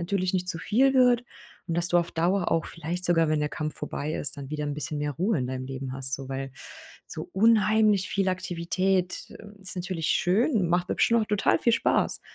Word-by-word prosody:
natürlich 185 +1 -1
nicht 180 -1 -1
zu 165 - -2
viel 265 +9 +3
wird 250 -2 +5 0.5
und 165 - -1
dass 175 0 +2
du 175 - +4
auf 170 - -1
Dauer 175 +3 0
auch 165 -1 +1
vielleicht 170 +2 -5
sogar, 165 -2 +3
wenn 155 - +1
der 150 0 -1
Kampf 155 +1 -4
vorbei 150 +1 -4
ist, 145 - -2
dann 140 -1 -8
wieder 150 -1 -3
'n 145 -1 -3
bisschen 150 0 -3
mehr 145 0 -2
Ruhe 185 - 0
in 125 - -2
deinem 130 0 -4
Leben 135 -1 -5
hast 130 0 -3
so. 135 -1 -7
Weil 135 0 -4 0.6
so - - -7
unheimlich 215 -1 +3
viel 195 -1 0
Aktivität 185 +1 -1 0.3
ist 185 0 -5
natürlich 175 -3 -3
schön, 200 - +2
macht 175 +1 +1
bestimmt 235 0 +3
auch - - -3
total 205 -2 +2
viel 235 - +2
Spaß, 230 - +2
175 Hz, 210 wpm, -26 LUFS, 150-195 Hz, 0.6 s, wird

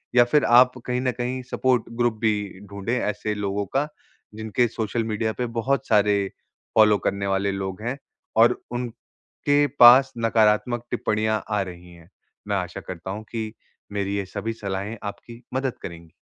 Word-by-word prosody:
या 120 - +8
फिर 145 +5 +3
आप 125 +1 +7
कहीं 125 0 -1
न 130 -1 +1
कहीं 125 +2 -3
सपोर्ट 125 -3 +2 0.2
ग्रुप 120 -1 +3
भी 105 -3 -1
ढूँढे 100 +5 -2
ऐसे 105 0 -2
लोगों 100 0 -2
का, 135 +9 -1 0.5
जिनके 110 +2 0
सोशल 115 +1 -2
मीडिया 110 0 -1
पे 125 - -1
बहुत 135 +2 0
सारे 105 -1 +4 0.6
फ़ॉलो 105 -2 +6
करने 100 0 0
वाले 100 +1 +1
लोग 95 +1 -4
हैं, 120 +4 -3 0.4
और 115 +1 +4
उनके 125 +4 -2
पास 130 +3 +8
नकारात्मक 115 +1 +2
टिप्पणियाँ 110 -2 0
आ 105 -1 +1
रही 90 -1 -8
हैं। 85 +1 -17 0.4
मैं 100 - 0
आशा 90 -2 -4
करता 90 +1 -6
हूँ 105 +2 -5
कि 110 -2 -3 0.4
मेरी 100 -1 -2
ये 100 - -2
सभी 110 +4 -4
सलाहें 100 +1 -4
आपकी 115 +4 -8
मदद 130 -1 -1
करेंगी। 85 -2 -9
110 Hz, 165 wpm, -24 LUFS, 100-120 Hz, 0.6 s, या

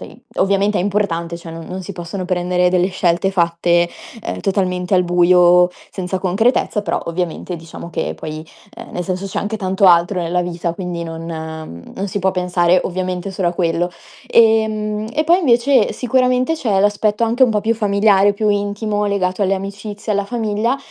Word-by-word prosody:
...tei - - -11 0.2
ovviamente 200 +2 +2
è - - +1
importante. 175 -4 -1
Cioè, 170 -1 -10
non 165 0 -8
non 185 +1 -5
si 200 +2 -7
possono 180 +1 -6
prendere 180 0 +1
delle 180 0 +2
scelte 185 0 +1
fatte, 170 -1 +2 0.4
ehm, - - -4
totalmente 185 -2 0
al 180 -1 +3
buio 175 0 +5 0.2
senza 185 0 -3
concretezza, 205 +4 +1
però - - -1
ovviamente, 175 +1 -3
diciamo, 165 +1 -10
che - - -3
poi, 155 0 -7 0.3
ehm, - - -10
nel 180 - -3
senso 185 +2 -3
c'è 195 - -4
anche 215 +1 -3
tanto 190 0 0
altro 175 +2 +4
nella 175 +2 0
vita 170 -1 -3
quindi 180 -2 -4
non 165 0 -7
mhmm, 160 - -7
non 195 - -2
si 205 - -3
può 190 0 +1
pensare 180 -1 +2
ovviamente 185 +1 -3
solo 185 -2 -1
a - - -2
quello. 175 0 0 0.4
Ehm, 215 -1 +2
e 305 +2 +1
poi 345 +3 +4
invece 260 -2 +3
sicuramente 255 +3 +1
c'è 215 -10 0
l'aspetto 210 +2 +1
anche 235 +3 +1
un 250 - +6
po' 210 -2 +1
più 225 +2 +1
familiare, 205 -1 +3
più 210 +1 -1
intimo 205 +1 -1
legato 195 -1 0
alle 195 - +1
amicizie 200 +2 -5
e - - 0
alla 200 - 0
famiglia, 225 +2 -1
190 Hz, 185 wpm, -18 LUFS, 175-210 Hz, 0.4 s, un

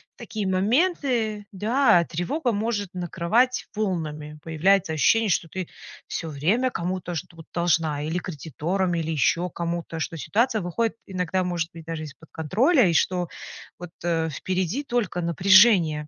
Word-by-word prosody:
В - - -67
такие 220 -4 -4
моменты, 220 - +1
да, 215 -2 +3
тревога 235 - -1
может 205 -3 -2
накрывать 185 +8 0
волнами. 155 -7 -3
Появляется 165 +1 +2
ощущение, 225 +8 +3
что 165 -2 0
ты 185 -2 -5 0.4
всё 165 - -4
время 190 - +1
кому-то 180 0 -3
что-то 165 -1 -7
должна 165 -4 +1
или 160 +3 -2
кредиторам, 175 +3 -2
или 165 -1 -2
еще 170 +3 +1
кому-то, 170 -1 -4
что 165 - -3
ситуация 220 - +1
выходит 215 +7 -1
иногда, 185 -1 -1
может 175 -2 -2
быть, 165 - -10
даже 165 -1 -5
из-под 155 +2 -12
контроля, 220 - +3
и 170 - +1
что 180 +1 +1 0.5
вот, 180 -1 -8 0.2
э, 165 -1 +1
впереди 185 - -2
только 235 -9 -1
напряжение. 170 -3 +5
180 Hz, 140 wpm, -25 LUFS, 165-215 Hz, 0.5 s, напряжение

